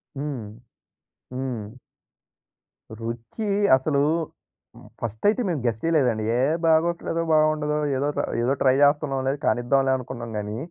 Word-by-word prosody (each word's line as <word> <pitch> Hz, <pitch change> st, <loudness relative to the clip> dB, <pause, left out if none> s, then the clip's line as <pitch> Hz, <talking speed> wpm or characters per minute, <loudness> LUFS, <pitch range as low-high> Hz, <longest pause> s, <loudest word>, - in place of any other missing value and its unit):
హ్మ్. 135 Hz, -6 st, -4 dB, 0.9 s
హ్మ్. 125 Hz, -3 st, -5 dB, 1.2 s
రుచి 115 Hz, -, -5 dB, 0.3 s
అసలు, 140 Hz, +1 st, 0 dB, 1.0 s
ఫస్ట్ 110 Hz, -1 st, -5 dB
అయితే 220 Hz, +4 st, 0 dB
మేము 160 Hz, -6 st, -1 dB
గెస్ 115 Hz, -2 st, 0 dB
చెయ్యలేదండి. 130 Hz, -10 st, +2 dB
"ఏహ్! 140 Hz, +6 st, +2 dB
బాగోట్లేదో 165 Hz, +1 st, +2 dB
బాగుండదో 155 Hz, -1 st, +2 dB, 0.2 s
ఏదో 140 Hz, +2 st, 0 dB, 0.3 s
ఏదో 125 Hz, +3 st, +2 dB
ట్రై 130 Hz, -1 st, +4 dB
చేస్తున్నాంలే, 135 Hz, -2 st, +2 dB
కానిద్దాంలే 135 Hz, +2 st, +2 dB
అనుకున్నాం 120 Hz, -2 st, -7 dB
గాని 105 Hz, +1 st, -4 dB
135 Hz, 105 wpm, -24 LUFS, 120-155 Hz, 1.2 s, ట్రై